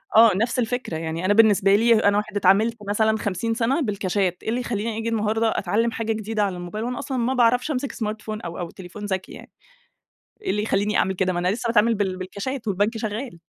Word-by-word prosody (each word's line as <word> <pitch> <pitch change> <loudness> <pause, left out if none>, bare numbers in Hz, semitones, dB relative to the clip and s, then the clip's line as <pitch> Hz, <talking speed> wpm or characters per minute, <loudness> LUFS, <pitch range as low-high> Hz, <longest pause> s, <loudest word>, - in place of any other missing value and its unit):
آه، 225 0 +8
نفس 230 +4 0
الفكرة 245 -8 -2
يعني 165 +2 -4
أنا 205 - +4
بالنسبة 205 -3 +5
لي 230 +3 +5
أنا 205 0 +3
واحد 210 0 -3
اتعاملت 205 +5 +3
مثلًا 220 +1 +2
50 205 +3 -2
سنة 245 +7 +1
بالكاشات، 195 -5 -1
إيه - - -3
اللي 245 +2 -1
خلّيني 220 -1 -3
أجي 225 +1 -2
النهارده 225 0 +1
أتعلم 230 +3 0
حاجة 225 0 -2
جديدة 215 0 -2
على 190 -3 -1
الموبايل، 195 +6 -5
وأنا 250 +2 -3
أصلًا 270 -2 -4
ما 245 +2 0
باعرفش 245 +4 +2
أمسك 275 0 -2
smartphone 215 -2 -5
أو 170 - -6
أو 175 -1 -4
تليفون 190 +3 -9
ذكي 190 -2 -3
يعني. - - -12 0.9
إيه 400 - -4
اللي 210 - -1
يخلّيني 210 -1 +1
أعمل 190 - +1
كده، 185 0 0
ما 175 - -1
أنا 180 - 0
لسه 230 +5 -1
باتعامل 230 0 +3
بال 190 -2 -1
بالكاشات، 215 +7 -5
والبنك 205 +4 0
شغال. 220 -2 -5
215 Hz, 215 wpm, -23 LUFS, 195-230 Hz, 0.9 s, آه